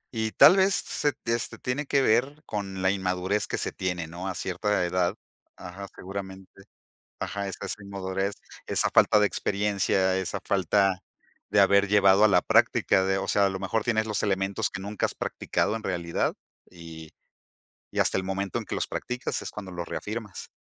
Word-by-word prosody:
Y 110 Hz, -1 st, -1 dB
tal 185 Hz, -, +7 dB
vez 190 Hz, +1 st, +4 dB
se 145 Hz, -1 st, 0 dB
t 115 Hz, 0 st, -3 dB
este, 115 Hz, -, -2 dB
tiene 135 Hz, +3 st, -3 dB
que 140 Hz, -1 st, +2 dB
ver 135 Hz, +7 st, +1 dB
con 95 Hz, -3 st, -4 dB
la 95 Hz, -, +4 dB
inmadurez 95 Hz, +1 st, -1 dB
que -, -, -2 dB
se -, -, -2 dB
tiene, 90 Hz, -3 st, -3 dB
¿no? 85 Hz, +4 st, -7 dB
A 95 Hz, -, -3 dB
cierta 95 Hz, 0 st, -1 dB
edad, 90 Hz, +2 st, 0 dB, 0.4 s
ajá, 95 Hz, +3 st, -9 dB
seguramente, 95 Hz, 0 st, -8 dB, 0.7 s
ajá, 100 Hz, +1 st, -3 dB
esa 95 Hz, -, -6 dB
esa 105 Hz, -, -5 dB
inmadurez, 95 Hz, 0 st, -3 dB, 0.3 s
esa -, -, +1 dB
falta 105 Hz, -, +5 dB
de 105 Hz, -, +5 dB
experiencia, 100 Hz, -2 st, 0 dB
esa 95 Hz, +1 st, -2 dB
falta 95 Hz, 0 st, +2 dB, 0.5 s
de 105 Hz, -, +4 dB
haber 100 Hz, +1 st, +4 dB
llevado 100 Hz, 0 st, +5 dB
a -, -, +7 dB
la 100 Hz, -, +4 dB
práctica 95 Hz, -, +3 dB
de, 95 Hz, 0 st, +1 dB
o 95 Hz, -, -4 dB
sea, 100 Hz, -, +3 dB
a 100 Hz, -, +2 dB
lo 95 Hz, -, -4 dB
mejor 105 Hz, +3 st, -1 dB
tienes 110 Hz, -2 st, +1 dB
los 105 Hz, -, -1 dB
elementos 100 Hz, +2 st, 0 dB
que 100 Hz, -, -6 dB
nunca 100 Hz, +2 st, -3 dB
has -, -, 0 dB
practicado 110 Hz, -, -1 dB
en 110 Hz, -, -7 dB
realidad, 85 Hz, -4 st, -1 dB, 0.4 s
y 80 Hz, -2 st, -11 dB, 0.8 s
y -, -, -6 dB
hasta -, -, +2 dB
el -, -, -1 dB
momento 95 Hz, -1 st, -2 dB
en -, -, -8 dB
que -, -, -4 dB
los -, -, -1 dB
practicas 125 Hz, +1 st, -3 dB
es -, -, -5 dB
cuando 95 Hz, -3 st, -8 dB
los 85 Hz, -1 st, -5 dB
reafirmas. 110 Hz, -1 st, -6 dB
100 Hz, 190 wpm, -26 LUFS, 95-105 Hz, 0.8 s, tal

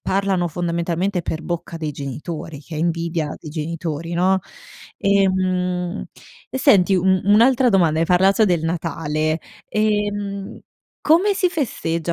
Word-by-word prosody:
parlano 190 Hz, -2 st, 0 dB
fondamentalmente 175 Hz, +3 st, -1 dB
per 160 Hz, 0 st, -4 dB
bocca 170 Hz, -1 st, -4 dB
dei 155 Hz, -2 st, -3 dB
genitori, 145 Hz, +2 st, -6 dB
che 155 Hz, +1 st, -9 dB
è -, -, -3 dB
invidia 165 Hz, -2 st, -1 dB
dei 155 Hz, -, -9 dB
genitori, 165 Hz, +1 st, -4 dB
no? 185 Hz, +2 st, +3 dB, 0.6 s
Ehm, 185 Hz, -2 st, 0 dB, 0.4 s
e 265 Hz, -, -4 dB
senti 200 Hz, -8 st, +5 dB
un 185 Hz, 0 st, +3 dB
un'altra 240 Hz, +5 st, +5 dB
domanda: 170 Hz, -6 st, +3 dB
hai 165 Hz, -, +2 dB
parlato 195 Hz, +4 st, +4 dB
del 175 Hz, -3 st, +1 dB
Natale, 160 Hz, -1 st, -1 dB, 0.3 s
ehm, 205 Hz, -2 st, -1 dB, 0.4 s
come 355 Hz, +7 st, +4 dB
si 370 Hz, -2 st, +2 dB
festeggia 170 Hz, -, -2 dB
180 Hz, 130 wpm, -21 LUFS, 165-200 Hz, 0.6 s, senti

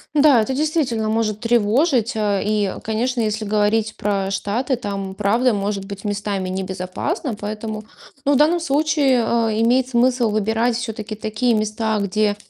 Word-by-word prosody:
Да, 285 Hz, -5 st, +6 dB
это 240 Hz, +5 st, -2 dB
действительно 275 Hz, -6 st, 0 dB
может 215 Hz, -1 st, 0 dB
тревожить. 240 Hz, +3 st, +2 dB
Э, 205 Hz, -2 st, 0 dB
и, 210 Hz, -2 st, 0 dB
конечно, 235 Hz, +3 st, -1 dB
если 215 Hz, 0 st, -1 dB
говорить 215 Hz, +1 st, +1 dB
про 200 Hz, -2 st, -1 dB
Штаты, 220 Hz, +7 st, -1 dB
там 195 Hz, -4 st, -5 dB
правда 225 Hz, +5 st, +2 dB
может 200 Hz, -1 st, -2 dB
быть 200 Hz, 0 st, -8 dB
местами 205 Hz, -2 st, -2 dB
небезопасно, 190 Hz, -, -3 dB
поэтому, 215 Hz, +1 st, -5 dB, 0.4 s
ну, 285 Hz, -, +4 dB
в -, -, +4 dB
данном 315 Hz, +5 st, +4 dB
случае, 285 Hz, -4 st, +2 dB
а, 230 Hz, -1 st, +1 dB
имеет 240 Hz, +4 st, +2 dB
смысл 245 Hz, -1 st, +2 dB
выбирать 220 Hz, +3 st, +1 dB
всё-таки 225 Hz, -3 st, -5 dB
такие 220 Hz, +3 st, 0 dB
места, 215 Hz, 0 st, 0 dB
где, 205 Hz, +1 st, +1 dB
220 Hz, 150 wpm, -20 LUFS, 205-245 Hz, 0.4 s, Да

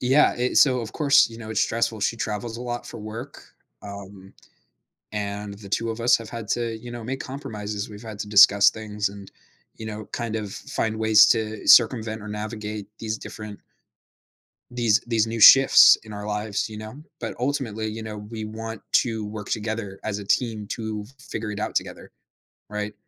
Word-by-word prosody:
Yeah, 135 Hz, +4 st, +4 dB
i 125 Hz, +1 st, 0 dB
so, 130 Hz, -3 st, +5 dB
of 110 Hz, -2 st, -7 dB
course, 145 Hz, -4 st, +4 dB
you 115 Hz, 0 st, -11 dB
know, 110 Hz, -1 st, -8 dB
it's 110 Hz, -, 0 dB
stressful. 115 Hz, -1 st, 0 dB
She 100 Hz, +4 st, 0 dB
travels 110 Hz, +1 st, -4 dB
a 120 Hz, -, -7 dB
lot 120 Hz, -1 st, -5 dB
for -, -, -9 dB
work, 115 Hz, +6 st, -8 dB, 0.4 s
um, 100 Hz, -1 st, -10 dB, 0.8 s
and 100 Hz, 0 st, -4 dB
the 100 Hz, -1 st, -12 dB
two 115 Hz, +3 st, -1 dB
of 115 Hz, +1 st, -5 dB
us 120 Hz, -, +5 dB
have 115 Hz, -1 st, -10 dB
had 115 Hz, -3 st, -7 dB
to, 115 Hz, -2 st, -1 dB
you 120 Hz, +2 st, -10 dB
know, 120 Hz, -2 st, -7 dB
make 135 Hz, +3 st, -4 dB
compromises. 110 Hz, -7 st, -6 dB
We've 105 Hz, +2 st, -11 dB
had 110 Hz, -2 st, -8 dB
to -, -, -4 dB
discuss 100 Hz, -1 st, +7 dB
things 105 Hz, -2 st, -3 dB
and, 100 Hz, -1 st, -12 dB, 0.4 s
you 110 Hz, -, -9 dB
know, 110 Hz, 0 st, -6 dB
kind 115 Hz, -2 st, -3 dB
of 105 Hz, -3 st, -4 dB
find 110 Hz, 0 st, -3 dB
ways 110 Hz, -1 st, +6 dB
to 110 Hz, -2 st, 0 dB
circumvent 110 Hz, -2 st, +5 dB
or 105 Hz, -, -9 dB
navigate 105 Hz, -1 st, -5 dB
these 110 Hz, -1 st, -3 dB
different 105 Hz, -1 st, -9 dB, 1.1 s
these 120 Hz, -3 st, +2 dB
these 115 Hz, -2 st, +1 dB
new 115 Hz, 0 st, -4 dB
shifts 135 Hz, +5 st, +9 dB
in 110 Hz, -1 st, -10 dB
our 105 Hz, 0 st, -6 dB
lives, 105 Hz, 0 st, -2 dB
you 105 Hz, -, -8 dB
know, 110 Hz, +3 st, -8 dB, 0.2 s
but 115 Hz, -, -4 dB
ultimately, 120 Hz, -5 st, -2 dB
you 110 Hz, +1 st, -5 dB
know, 110 Hz, -1 st, -6 dB
we 110 Hz, +1 st, -7 dB
want 110 Hz, 0 st, -7 dB
to 110 Hz, -3 st, +1 dB
work 105 Hz, 0 st, -7 dB
together 110 Hz, -2 st, -3 dB
as 105 Hz, -1 st, -2 dB
a -, -, -7 dB
team 110 Hz, -1 st, 0 dB
to 110 Hz, -2 st, -5 dB
figure 115 Hz, -4 st, -6 dB
it 105 Hz, -, -5 dB
out -, -, -3 dB
together, -, -, -3 dB, 0.6 s
right? 105 Hz, 0 st, -4 dB
110 Hz, 190 wpm, -24 LUFS, 105-115 Hz, 1.1 s, shifts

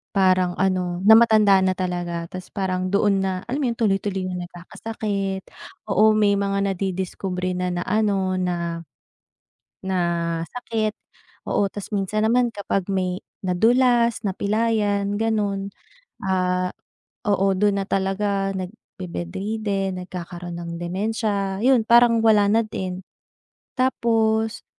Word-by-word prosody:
parang 185 Hz, -2 st, +3 dB
ano, 185 Hz, -1 st, 0 dB
na 215 Hz, +3 st, +8 dB
matanda 215 Hz, -4 st, +5 dB
na 185 Hz, 0 st, +1 dB
talaga 175 Hz, -2 st, -3 dB
tapos 185 Hz, 0 st, -7 dB
parang 185 Hz, -2 st, -1 dB
doon 200 Hz, -1 st, +3 dB
na, 190 Hz, 0 st, 0 dB, 0.2 s
alam 270 Hz, +4 st, -1 dB
mo 270 Hz, -, +1 dB
'yon 235 Hz, -, -2 dB
tuloy-tuloy 195 Hz, -3 st, 0 dB
na 180 Hz, -1 st, -4 dB
nagkakasakit, 195 Hz, +1 st, -4 dB, 0.5 s
oo, 215 Hz, +1 st, +5 dB
may 205 Hz, -1 st, +4 dB
mga 200 Hz, 0 st, 0 dB
nadidiskubre 185 Hz, 0 st, -3 dB
na, 180 Hz, 0 st, -1 dB
na-ano 190 Hz, 0 st, 0 dB
na, 170 Hz, -2 st, -2 dB, 1.0 s
na 190 Hz, -1 st, -1 dB, 0.5 s
sakit, 225 Hz, -3 st, -2 dB, 0.6 s
oo. -, -, +2 dB
Tas 205 Hz, -, -7 dB
minsan 210 Hz, +2 st, 0 dB
naman 240 Hz, 0 st, +2 dB
kapag 200 Hz, -3 st, -2 dB
may 185 Hz, -1 st, -2 dB, 0.2 s
nadulas, 235 Hz, +5 st, +3 dB
napilayan 205 Hz, 0 st, 0 dB
gano'n, 205 Hz, -3 st, -1 dB, 0.6 s
ah, 185 Hz, -1 st, 0 dB, 0.6 s
oo, 195 Hz, -1 st, +3 dB
do'n 200 Hz, 0 st, +2 dB
na -, -, -4 dB
talaga 195 Hz, 0 st, 0 dB
nagbe-bed-ridden 190 Hz, -, -4 dB
nagkakaroon 175 Hz, -1 st, -7 dB
ng 170 Hz, -1 st, -6 dB
dementia, 200 Hz, +1 st, -2 dB
ayun 250 Hz, 0 st, +4 dB
parang 235 Hz, -1 st, +5 dB
wala 210 Hz, -2 st, +5 dB
na 220 Hz, +3 st, +3 dB
din. 185 Hz, -3 st, -5 dB, 0.7 s
Tapos, 225 Hz, -3 st, +1 dB
195 Hz, 120 wpm, -23 LUFS, 185-215 Hz, 1.0 s, na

